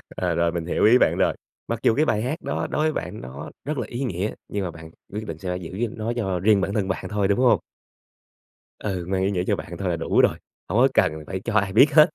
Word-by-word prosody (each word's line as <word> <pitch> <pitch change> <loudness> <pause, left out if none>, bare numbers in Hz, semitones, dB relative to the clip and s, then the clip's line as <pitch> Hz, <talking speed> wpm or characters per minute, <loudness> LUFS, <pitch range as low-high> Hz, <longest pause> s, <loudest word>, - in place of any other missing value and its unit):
ờ, - - 0
rồi 85 0 +2
mình 85 -1 -3
hiểu 90 - +1
ý 120 +3 +7
bạn - - +3
rồi. - - +3 0.3
Mặc 115 -1 -2
dù 110 - +4
cái 155 - +3
bài 110 -7 +1
hát 145 +8 -3
đó - - -2
đối 150 - 0
với 155 0 +2
bạn - - -5
nó 70 +4 -8 0.2
rất 150 +1 -2
là 120 -5 -2
ý 120 +5 -4
nghĩa 100 -2 -2 0.2
nhưng 100 -1 -2
mà 90 - -3
bạn 80 0 -11 0.2
quyết 110 +1 -4
định 80 - -5
sẽ 90 +1 -3
giữ 95 +6 -3
nó 110 +2 -2
cho 95 -6 -1
riêng 100 +2 +4
bản 100 - -1
thân 100 -3 0
bạn 95 - -3
thôi, 105 -2 +1
đúng 100 +3 +1
hông? 120 -7 +5 1.2
Ừ, 95 -4 -3
mang 95 0 0
ý 100 - +1
nghĩa 90 -2 0
cho - - +3
bạn - - -7
thôi - - -2
là - - +1
đủ - - +3
rồi, - - +3 0.3
hổng 105 +6 +2
có 130 - +7
cần 80 - +4 0.2
phải 95 - -3
cho 115 - -2
ai 100 -3 +2
biết 135 +8 +6
hết. 155 +1 +8
100 Hz, 270 wpm, -24 LUFS, 90-120 Hz, 1.2 s, hết